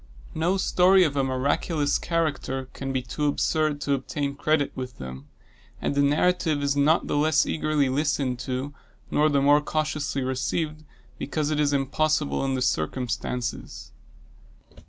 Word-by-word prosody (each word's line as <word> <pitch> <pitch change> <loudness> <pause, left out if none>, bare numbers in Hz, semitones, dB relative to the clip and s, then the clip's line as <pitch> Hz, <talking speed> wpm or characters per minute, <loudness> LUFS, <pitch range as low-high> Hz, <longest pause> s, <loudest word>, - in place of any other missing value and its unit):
No 170 +5 +1
story 185 0 +4
of 150 -4 0
a 135 - +2
miraculous 145 +3 0
character 145 -6 -2
can 135 0 -4
be 130 -1 -1
too 150 +3 -2
absurd 155 0 0
to 140 - 0
obtain 140 +1 -2
credit 145 0 +1
with 125 -1 -7
them; 65 +2 -8 0.5
and - - -2
a 140 - +3
narrative 155 +1 +2
is 140 0 +1
not 150 +4 +3
the - - -2
less 155 +1 +3
eagerly 155 -3 0
listened 135 -2 0
to, 130 +3 -4 0.4
nor 150 +1 +3
the 140 -2 +2
more 145 +1 +5
cautiously 150 -2 -2
received, 155 +4 -2 0.4
because 150 +1 -2
it 150 - 0
is 145 -1 +2
impossible 150 +2 0
in 135 -1 0
its 125 - 0
circumstances. 125 - -3
145 Hz, 150 wpm, -25 LUFS, 135-155 Hz, 0.5 s, more